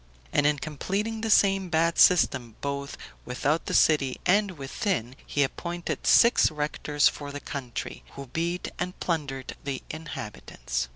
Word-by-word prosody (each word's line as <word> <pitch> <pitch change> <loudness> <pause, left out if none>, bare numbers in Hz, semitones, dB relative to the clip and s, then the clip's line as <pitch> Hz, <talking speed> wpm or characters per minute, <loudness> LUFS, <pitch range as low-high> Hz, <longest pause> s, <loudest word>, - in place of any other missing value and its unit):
And 145 0 +4
in 150 0 +2
completing 200 +10 -3
the 225 - -2
same 195 -3 +4
bad 165 0 +2
system, 130 - +4
both 140 0 -4 0.3
without 145 +6 -1
the - - -1
city 140 -5 +3
and 200 +2 +4
within, 135 - -2
he 145 - +2
appointed 170 +5 -4
six 235 +1 +6
rectors 150 -1 +1
for 145 -1 -4
the 145 - -5
country, 135 -4 -6
who 140 - -8
beat 170 +7 -2
and 180 - -4
plundered 140 -6 -3
the 135 -2 -4
inhabitants. 65 - -5
150 Hz, 140 wpm, -27 LUFS, 135-175 Hz, 0.3 s, six